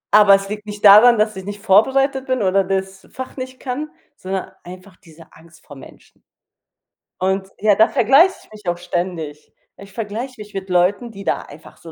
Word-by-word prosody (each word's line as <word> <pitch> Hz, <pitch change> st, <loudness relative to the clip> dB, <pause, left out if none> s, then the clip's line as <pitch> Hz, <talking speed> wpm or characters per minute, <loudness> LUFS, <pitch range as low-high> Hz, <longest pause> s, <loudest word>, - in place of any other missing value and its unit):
Aber 205 Hz, -2 st, +7 dB
es 195 Hz, 0 st, -3 dB
liegt 210 Hz, +1 st, -7 dB
nicht 210 Hz, 0 st, -5 dB
daran, 220 Hz, +4 st, +8 dB
dass 215 Hz, 0 st, 0 dB
ich 190 Hz, -, -8 dB
nicht 205 Hz, +1 st, -7 dB
vorbereitet 265 Hz, +7 st, +2 dB
bin 255 Hz, -4 st, -1 dB
oder 195 Hz, +1 st, +2 dB
das 190 Hz, 0 st, -4 dB
Fach 260 Hz, 0 st, -8 dB
nicht 255 Hz, -1 st, -8 dB
kann, 280 Hz, +4 st, -5 dB, 0.3 s
sondern 190 Hz, -4 st, -5 dB
einfach 185 Hz, +2 st, -13 dB
diese 165 Hz, -3 st, -19 dB
Angst 165 Hz, +1 st, -20 dB
vor 145 Hz, -, -13 dB
Menschen. 135 Hz, -, -17 dB, 1.0 s
Und, 190 Hz, +1 st, -1 dB
ja, 210 Hz, -1 st, +3 dB
da 220 Hz, +3 st, +4 dB
vergleiche 275 Hz, -, +4 dB
ich -, -, -29 dB
mich 210 Hz, -4 st, -6 dB
auch 175 Hz, -, -2 dB
ständig. 175 Hz, -4 st, -5 dB, 0.2 s
Ich 195 Hz, 0 st, -14 dB
vergleiche 225 Hz, +4 st, -6 dB
mich 210 Hz, 0 st, -11 dB
mit 195 Hz, -1 st, -6 dB
Leuten, 190 Hz, +6 st, +1 dB
die 195 Hz, -1 st, -11 dB
da -, -, -1 dB
einfach 150 Hz, +2 st, -15 dB
so 165 Hz, -, -13 dB
200 Hz, 190 wpm, -19 LUFS, 185-225 Hz, 1.0 s, daran